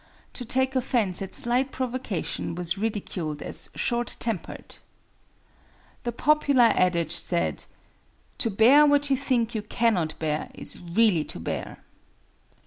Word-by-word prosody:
To 250 - -4
take 260 +2 +1
offense 235 -8 0
at 190 -1 -5
slight 250 +3 +1
provocation 250 -10 -3
was 175 0 -1
ridiculed 195 -7 -3
as - - -7
"short 240 0 -1
tempered." 225 -7 -4 1.3
The 240 - 0
popular 280 -2 +3
adage 170 -3 +1
said: 80 -3 -1 0.7
"To 230 - +1
bear 250 +9 +6
what 290 -1 +3
you - - +5
think 250 -4 0
you 220 - -2
cannot 210 -7 0
bear 155 -1 -2
is - - -7
really 175 -1 +2
to - - -7
bear." - - -5
225 Hz, 130 wpm, -26 LUFS, 180-255 Hz, 1.3 s, bear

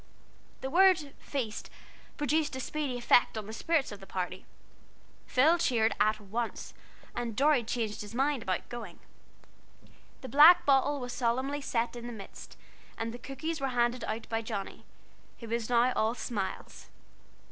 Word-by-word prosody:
The 265 - -3
word 350 -5 +4
"Feast" 240 -7 -4 0.5
produced 295 0 0
a - - -4
speedy 275 -1 -3
effect 240 -1 +3
on 215 - -4
the 220 - -8
spirits 310 +3 0
of 205 - -8
the 195 - -13
party. 185 0 -4 0.8
Phil 315 +7 +4
cheered 225 -8 +2
at 215 +1 +3
once, 220 +3 -4 0.4
and 235 -3 -3
Dorry 280 -1 +3
changed 220 -2 -3
his 210 +2 -8
mind 275 0 +1
about 185 -3 -2
going. 225 -7 -8 1.2
The 260 - -7
black 320 +6 +8
bottle 280 +1 +3
was 245 -1 -5
solemnly 260 +4 -1
set 235 -3 -1
in 240 0 -7
the 240 - -6
midst, 200 -3 -11 0.4
and 225 0 -3
the 245 - -8
cookies 295 +5 -5
were 270 - +1
handed 240 +1 +2
about 225 +1 -4
by 225 0 -1
Johnnie, 215 -3 -6 0.5
who 230 - -9
was 230 0 -2
now 245 +1 +3
all 220 +2 +1
smiles. 210 -4 -5
240 Hz, 160 wpm, -30 LUFS, 220-280 Hz, 1.2 s, black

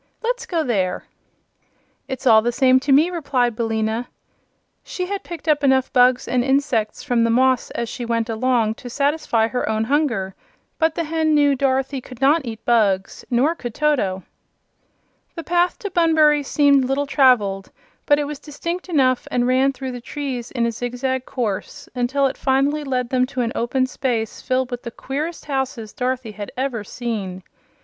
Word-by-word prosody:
"Let's 480 0 -2
go 335 -6 0
there." 195 -9 -1 1.0
"It's 265 -1 -6
all 220 -3 +7
the 240 +2 0
same 260 +1 +4
to 275 +2 -2
me," 305 +6 +5
replied 255 -8 0
Billina. 225 +1 -1 0.8
She 365 - -4
had 400 +1 -4
picked 340 -2 -9
up 295 -2 +2
enough 265 -1 +2
bugs 250 -1 +4
and 245 0 +1
insects 265 -5 0
from 240 -2 +1
the 230 - +2
moss 255 +1 +2
as 235 - -2
she 240 - -6
went 230 -1 -1
along 230 -1 +1
to 245 - -7
satisfy 280 -4 +1
her 250 0 -2
own 220 0 0
hunger, 235 -8 0 0.5
but 320 -1 +2
the 335 - -1
hen 315 -1 +1
knew 290 -1 +4
Dorothy 270 0 0
could 250 -1 -12
not 285 +3 +3
eat 225 -1 -7
bugs; 205 -5 +1
nor 265 +6 +2
could 240 -9 -7
Toto. 225 -12 0 1.1
The 330 - -6
path 350 +1 +1
to 405 - -6
Bunbury 315 -4 +4
seemed 280 -1 +3
little 270 +2 0
traveled, 240 -9 +3 0.4
but 290 - +5
it 295 - 0
was 290 -1 -6
distinct 335 +5 -5
enough 260 -6 +2
and 245 -1 +1
ran 260 +2 +3
through 265 -1 -6
the 245 -1 -7
trees 260 -2 -5
in 240 -3 -1
a 235 - 0
zigzag 250 +2 -3
course 220 -7 -4
until 265 +3 0
it 265 - -1
finally 275 +3 +1
led 255 -3 -2
them 255 -1 +2
to 255 -1 -3
an 230 -1 -1
open 255 +3 0
space 245 -4 -3
filled 255 0 -1
with 245 0 -4
the 235 - -6
queerest 295 +8 -5
houses 265 -6 -3
Dorothy 250 -2 -2
had 205 -1 -7
ever 255 -5 -2
seen. 200 -5 -5
260 Hz, 175 wpm, -21 LUFS, 235-285 Hz, 1.1 s, all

